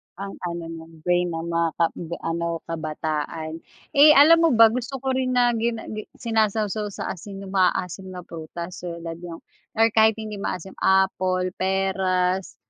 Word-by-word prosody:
Ang 195 Hz, +2 st, -7 dB
ano 170 Hz, 0 st, -5 dB
no'n, 160 Hz, -1 st, -11 dB
brain 180 Hz, +1 st, +2 dB
ng 165 Hz, -1 st, -4 dB
mga 170 Hz, 0 st, +1 dB
ka 170 Hz, -, +3 dB
ga 170 Hz, 0 st, -6 dB
ano, 170 Hz, 0 st, -2 dB
kabataan. 155 Hz, 0 st, -4 dB, 0.3 s
Eh, 300 Hz, +1 st, +7 dB
alam 315 Hz, +4 st, +8 dB
mo 330 Hz, 0 st, +4 dB
ba, 225 Hz, -1 st, +7 dB
gusto 255 Hz, +3 st, -4 dB
ko 265 Hz, -, 0 dB
rin 260 Hz, -1 st, 0 dB
na 245 Hz, -1 st, +4 dB
gin 230 Hz, +1 st, 0 dB, 0.2 s
gi 215 Hz, 0 st, -4 dB
sinasaw 220 Hz, -2 st, +1 dB
sa 210 Hz, -1 st, -4 dB
asin 195 Hz, +2 st, -8 dB
yung 190 Hz, -, -9 dB
maaasim 185 Hz, 0 st, 0 dB
na 180 Hz, -, -7 dB
prutas 170 Hz, +2 st, -8 dB
tulad 170 Hz, -1 st, -6 dB
yung 170 Hz, -1 st, -9 dB, 0.3 s
or 225 Hz, 0 st, +4 dB
kahit 220 Hz, 0 st, +5 dB
hindi 215 Hz, -2 st, -6 dB
maasim, 190 Hz, -1 st, -4 dB
apple, 185 Hz, -1 st, +2 dB
peras, 190 Hz, -1 st, 0 dB
185 Hz, 165 wpm, -24 LUFS, 170-220 Hz, 0.3 s, alam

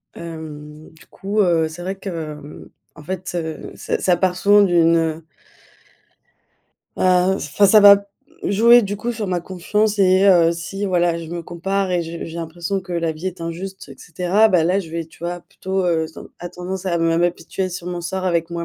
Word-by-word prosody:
hem, 155 Hz, -2 st, -9 dB
du 160 Hz, -, -19 dB
coup, 200 Hz, +2 st, -4 dB
heu, 170 Hz, -4 st, +2 dB
c'est 160 Hz, +2 st, -9 dB
vrai 190 Hz, +2 st, -4 dB
que 195 Hz, 0 st, -7 dB
hem, 155 Hz, -4 st, -8 dB, 0.3 s
en 150 Hz, -, -13 dB
fait, 185 Hz, +2 st, -5 dB
heu, 160 Hz, -2 st, -5 dB
ça -, -, -3 dB
ça 180 Hz, -2 st, +2 dB
part 180 Hz, 0 st, +1 dB
souvent 205 Hz, +2 st, +5 dB
d'une, 170 Hz, -3 st, +4 dB
heu 160 Hz, 0 st, -1 dB, 1.7 s
heu, 185 Hz, +1 st, +3 dB
enfin 200 Hz, -, +2 dB
ça 215 Hz, +2 st, +6 dB
va 200 Hz, 0 st, +7 dB, 0.4 s
jouer 235 Hz, +4 st, +5 dB
du 205 Hz, 0 st, -3 dB
coup 235 Hz, +4 st, -3 dB
sur 220 Hz, -2 st, -4 dB
ma 180 Hz, -2 st, -1 dB
confiance, 205 Hz, +4 st, -1 dB
et 190 Hz, 0 st, +4 dB
heu, 170 Hz, -3 st, +5 dB
si 170 Hz, +4 st, -5 dB
voilà 175 Hz, -2 st, +1 dB
je 165 Hz, -, -7 dB
me 170 Hz, -1 st, -5 dB
compare 190 Hz, +3 st, -2 dB
et 175 Hz, -1 st, +1 dB
je 165 Hz, 0 st, -6 dB
j'ai 165 Hz, -, -8 dB
l'impression 170 Hz, +3 st, -3 dB
que 180 Hz, -1 st, -9 dB
la 165 Hz, -1 st, 0 dB
vie 160 Hz, +4 st, -7 dB
est 185 Hz, -2 st, -5 dB
injuste 175 Hz, +2 st, -6 dB
et 135 Hz, -, -12 dB
cetera, 180 Hz, +7 st, +2 dB
bah, 180 Hz, -5 st, +3 dB
là 180 Hz, +4 st, +2 dB
je 175 Hz, -5 st, -6 dB
vais 165 Hz, 0 st, -3 dB
tu -, -, -20 dB
vois 175 Hz, 0 st, -4 dB
plutôt, 190 Hz, +2 st, -4 dB
heu, 165 Hz, -2 st, +1 dB
se 160 Hz, -, -16 dB
ten -, -, -11 dB
à 175 Hz, -, -6 dB
tendance 185 Hz, +2 st, -6 dB
à 170 Hz, -2 st, 0 dB
me 165 Hz, 0 st, +1 dB
à 170 Hz, +1 st, +3 dB
m'apitoyer 185 Hz, +2 st, -4 dB
sur 175 Hz, -1 st, -7 dB
mon 175 Hz, -1 st, -4 dB
sort 185 Hz, +2 st, -4 dB
avec 170 Hz, -2 st, 0 dB
moi 170 Hz, 0 st, -4 dB
175 Hz, 210 wpm, -20 LUFS, 165-190 Hz, 1.7 s, va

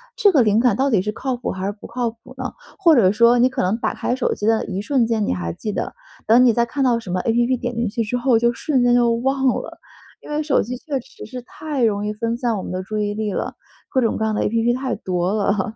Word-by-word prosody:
这 405 Hz, -, +4 dB
个 285 Hz, -7 st, +4 dB
灵 215 Hz, -1 st, +3 dB
感 240 Hz, -3 st, +3 dB
到 275 Hz, +1 st, +2 dB
底 215 Hz, -8 st, +3 dB
是 210 Hz, +3 st, -2 dB
靠 255 Hz, +3 st, -3 dB
谱 240 Hz, -, -4 dB
还 190 Hz, 0 st, -4 dB
是 200 Hz, -, 0 dB
不 205 Hz, -, -12 dB
靠 240 Hz, 0 st, -2 dB
谱 230 Hz, -, -16 dB
呢？ -, -, -4 dB, 0.2 s
或 340 Hz, -5 st, +5 dB
者 195 Hz, -7 st, +5 dB
说 235 Hz, +3 st, +4 dB
你 250 Hz, +2 st, +5 dB
可 260 Hz, 0 st, -2 dB
能 190 Hz, +5 st, +1 dB
打 -, -, -1 dB
开 245 Hz, -, -1 dB
手 260 Hz, -, 0 dB
机 205 Hz, -, -5 dB
的 225 Hz, 0 st, +2 dB
一 195 Hz, 0 st, -3 dB
瞬 245 Hz, +1 st, +1 dB
间， 225 Hz, -2 st, 0 dB
你 -, -, 0 dB
还 85 Hz, -2 st, -3 dB
记 210 Hz, -, -5 dB
得， -, -, -3 dB, 0.3 s
等 240 Hz, +3 st, +6 dB
你 240 Hz, -, +5 dB
再 235 Hz, +1 st, +2 dB
看 275 Hz, +4 st, -2 dB
到 240 Hz, -3 st, +3 dB
什 215 Hz, -, -10 dB
么 180 Hz, +1 st, 0 dB
APP 240 Hz, +3 st, +1 dB
点 245 Hz, -1 st, -3 dB
进 235 Hz, -1 st, 0 dB
去 230 Hz, +3 st, -1 dB
之 235 Hz, +3 st, -2 dB
后 245 Hz, -2 st, +3 dB
就 235 Hz, +1 st, +2 dB
瞬 260 Hz, 0 st, 0 dB
间 245 Hz, 0 st, +4 dB
就 240 Hz, -1 st, +4 dB
忘 265 Hz, +3 st, 0 dB
了， 255 Hz, -, -2 dB, 0.4 s
因 -, -, -13 dB
为 300 Hz, +1 st, -1 dB
手 290 Hz, -3 st, +2 dB
机 250 Hz, +3 st, -5 dB
确 280 Hz, 0 st, -3 dB
实 -, -, -12 dB
是 250 Hz, +3 st, -7 dB
太 285 Hz, +1 st, -4 dB
容 210 Hz, -2 st, +1 dB
易 210 Hz, -, -2 dB
分 230 Hz, +2 st, -2 dB
散 240 Hz, -3 st, 0 dB
我 190 Hz, -, -5 dB
们 -, -, -6 dB
的 185 Hz, 0 st, -3 dB
注 215 Hz, +3 st, -5 dB
意 205 Hz, 0 st, -1 dB
力 215 Hz, -2 st, -2 dB
了， -, -, -3 dB, 0.3 s
各 260 Hz, -, +1 dB
种 230 Hz, -3 st, +1 dB
各 220 Hz, -, -2 dB
样 220 Hz, -, 0 dB
的 -, -, 0 dB
APP 230 Hz, +2 st, +1 dB
太 260 Hz, -2 st, -2 dB
多 180 Hz, +1 st, -1 dB
了。 205 Hz, 0 st, 0 dB
235 Hz, 320 characters per minute, -21 LUFS, 210-250 Hz, 0.4 s, 等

